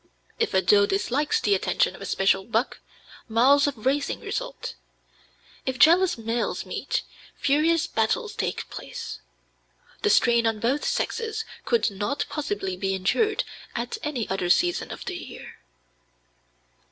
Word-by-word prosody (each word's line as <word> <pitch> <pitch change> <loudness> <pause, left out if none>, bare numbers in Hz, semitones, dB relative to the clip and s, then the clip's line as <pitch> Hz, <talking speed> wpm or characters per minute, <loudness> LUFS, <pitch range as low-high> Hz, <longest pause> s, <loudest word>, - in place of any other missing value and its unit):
If - - 0
a 190 - +4
doe 200 -1 +5
dislikes 295 -7 +1
the 205 - +2
attention 190 -1 +1
of - - -13
a 195 - -5
special 195 0 +2
buck, 230 +4 -1 0.5
miles 265 +6 +5
of 250 -6 -5
racing 280 +2 +1
result. - - -4 0.9
If 260 -1 -2
jealous 345 +3 +5
males 230 +1 -2
meet, - - -2 0.3
furious 310 +4 +2
battles 225 -9 0
take - - -3
place. - - -7 0.8
The - - +2
strain 235 -1 +4
on 225 -1 0
both 255 +7 0
sexes 455 -2 -1 0.2
could 465 - +2
not 205 +8 -2
possibly 205 -10 -3
be 195 +1 -1
endured 410 - +1 0.3
at 470 - -3
any 270 -8 -2
other 190 -2 -1
season 350 - +2
of - - -8
the 370 -2 -4
year. 255 - -10
255 Hz, 140 wpm, -25 LUFS, 205-330 Hz, 0.9 s, doe